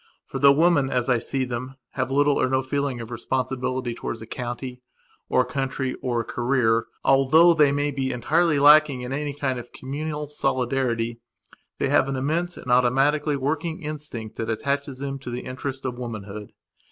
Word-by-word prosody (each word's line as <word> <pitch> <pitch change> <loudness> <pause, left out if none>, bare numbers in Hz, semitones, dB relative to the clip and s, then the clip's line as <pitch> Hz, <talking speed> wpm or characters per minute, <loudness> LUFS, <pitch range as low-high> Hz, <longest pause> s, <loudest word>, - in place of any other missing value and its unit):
For, - - -5
though 140 -1 +7
women, 150 -2 +3
as 125 -1 0
I 120 - +3
see 130 +3 -2
them, 125 +2 -5 0.2
have 130 -1 -2
little 145 +1 +3
or - - +2
no 130 0 +1
feeling 140 -1 -2
of 115 0 -7
responsibility 130 +1 -2
towards 115 0 -5
a 110 - -8
county 125 +1 -6 0.5
or 130 - +4
a - - -1
country 135 -1 -2
or 120 -2 0
a - - -8
careeralthough 135 +6 +3
they 150 -3 +5
may 145 +1 0
be 135 -1 -2
entirely 155 +6 +2
lacking 145 -2 +6
in 125 +2 -4
any 145 0 -3
kind 130 -3 -1
of 120 - -11
communal 150 +3 -4
solidaritythey 130 -4 -1 0.6
have 135 - +3
an 135 - -1
immense 165 +7 -1
and 125 - -5
automatically 135 +5 +3
working 160 +5 -2
instinct 150 -8 -6
that 115 - -3
attaches 140 +4 -2
them 135 0 -4
to 130 - -8
the 120 +1 -4
interest 130 +1 -6
of 125 -1 -3
womanhood. 105 -3 -7
130 Hz, 175 wpm, -24 LUFS, 125-145 Hz, 0.6 s, though